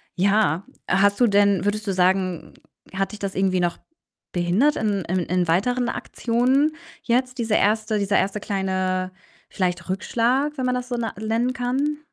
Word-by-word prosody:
ja. 195 -2 +2 0.3
Hast 200 +3 +3
du 240 - +6
denn 200 -2 +3
würdest 210 +1 -1
du 195 - 0
sagen, 185 -1 0 0.4
hat 195 +2 -1
dich 210 - -8
das 195 -1 -3
irgendwie 190 -1 +1
noch 175 -1 0 0.6
behindert 185 +12 +2
in 205 -4 0
in 185 +2 0
in 180 0 0
weiteren 245 +9 +1
Aktionen 260 +6 0 0.3
jetzt, 255 +2 0
diese 220 -2 +1
1. 215 +1 +2
dieser 200 0 +1
1. 200 +2 -1
kleine, 185 -1 -1 0.4
vielleicht, 180 -2 -2
Rückschlag, 250 +9 0
wenn 260 - -1
man 250 0 +1
das 250 0 -4
so 245 - -2
na 225 -3 -3
nennen 225 +4 0
kann? 270 +4 -1
205 Hz, 165 wpm, -23 LUFS, 185-245 Hz, 0.6 s, du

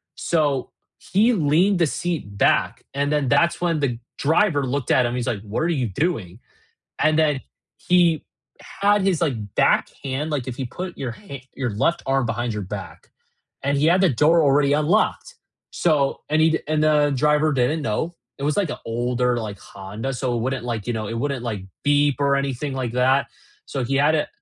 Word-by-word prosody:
So, 145 -6 0 0.3
he 220 +6 +2
leaned 180 +3 +3
the 165 - +3
seat 155 -12 -3
back, - - +2
and 140 +1 0
then 150 -3 +1
that's 170 +8 +2
when 170 -3 +1
the 125 -5 -1 0.2
driver 155 -1 +2
looked 130 0 -2
at 125 - +4
him, 120 - -2
he's 125 -2 -3
like, 105 -5 -2
"What 105 +1 -4
are - - +1
you 130 -8 0
doing?" 105 - -2 0.6
And 155 0 +3
then 150 -4 +2 0.4
he 175 -3 +2 0.6
had 205 0 +4
his, 190 -4 +1
like, 110 - -2
back - - +3
hand, 140 +3 -3
like, 135 -4 -2
if 125 +1 -5
you 130 - -2
put 180 +7 -7
your 125 -4 -3
ha 140 - -10
your 130 -3 -2
left 170 +12 0
arm 135 -1 +1
behind 120 +1 -2
your 105 -1 -4
back, 95 - -8 0.5
and 140 +1 0
he 150 - +3
had 180 +3 +4
the 190 - +5
door 160 +6 +4
already 140 0 +3
unlocked. 205 - +1 0.3
So 150 -5 +1
and 155 +1 +2
he'd 160 0 +2
and 155 0 +1
the 150 -1 +3
driver 150 +2 +2
didn't 135 +4 +1
know, 115 +10 -2 0.3
it - - -7
was, 150 - 0
like, 200 -6 +1
a - - -5
older, 120 +1 0
like, 105 -3 -5
Honda, 105 +7 -6
so 125 -1 -1
it - - -1
wouldn't, 130 0 -2
like, 115 -3 -4
you 120 - -1
know, 110 -2 -3
it - - -4
wouldn't, 140 -1 -2
like, 105 -5 -4 0.2
beep 145 -1 +3
or 140 0 +3
anything 140 0 -2
like 125 -3 -3
that. 130 +2 +2 0.4
So 135 - -3
he 135 +3 -1
had 145 +3 +3
a 150 - -1
140 Hz, 200 wpm, -22 LUFS, 120-155 Hz, 0.6 s, the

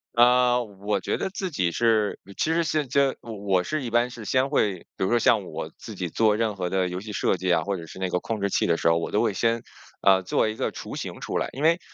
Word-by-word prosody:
呃， 125 +1 +5
我 100 0 -3
觉 - - -2
得 - - -2
自 190 -1 -4
己 90 - 0
是 110 +1 +1 0.2
其 160 - +1
实 170 +1 +2
是 155 -1 0
这 140 +1 +2
我 115 - -9
我 100 -3 0
是 155 +6 -2
一 125 - -4
般 120 +1 +2
是 120 -3 -9
先 130 +5 +2
会 105 -9 +1 0.2
比 - - 0
如 - - 0
说 120 - +4
像 110 -3 +3
我 - - -6
自 - - -9
己 90 - -3
做 110 +5 +3
任 110 -2 -1
何 90 -1 -2
的 95 0 0
游 90 +1 -4
戏 105 +2 -8
设 95 - +1
计 90 +1 -2
啊， 85 -2 +3
或 100 -1 -2
者 85 - -8
是 - - -11
那 95 -1 -2
个 90 - 0
控 110 +2 -4
制 100 - +1
器 - - +1
的 85 - +3
时 80 - +2
候， 85 - +3
我 85 - -2
都 105 - +1
会 110 - +1
先， 115 +3 0 0.4
呃， 95 -1 +5
做 95 +4 +1
一 110 - -4
个 - - -2
雏 - - -7
形 - - -6
出 - - -2
来。 - - 0
因 140 - -5
为 165 +2 +4
105 Hz, 300 characters per minute, -25 LUFS, 95-125 Hz, 0.4 s, 呃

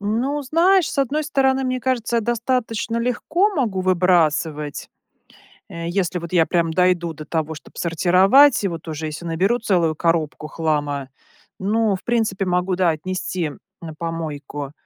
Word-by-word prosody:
Ну, 245 +8 -1
знаешь, 340 +6 +3
с - - -5
одной 285 +3 0
стороны, 270 -2 +1
мне 255 0 -1
кажется, 240 -2 -1
я - - +3
достаточно 230 0 -1
легко 300 - +1
могу 220 - 0
выбрасывать. 165 -5 +1 0.8
Э, 170 0 -6
если 180 -1 -1
вот 170 0 -8
я 165 -3 +4
прям 170 -2 0
дойду 180 -1 +2
до 155 0 -9
того, 160 0 -2
чтоб - - -14
сортировать, 190 - +4
и - - +2
вот 165 -2 -6
уже 155 0 -4
еси 155 +3 -7
наберу 190 +9 +1
целую 175 -7 +1
коробку 160 -2 -1
хлама. 145 -4 -2 0.5
Ну, 215 +1 +1
в 185 - -10
принципе 220 -5 0
могу, 180 +1 0
да, 180 -1 +2
отнести 175 0 -3 0.3
на 160 -2 -7
помойку. 150 -4 -5
185 Hz, 155 wpm, -21 LUFS, 165-235 Hz, 0.8 s, я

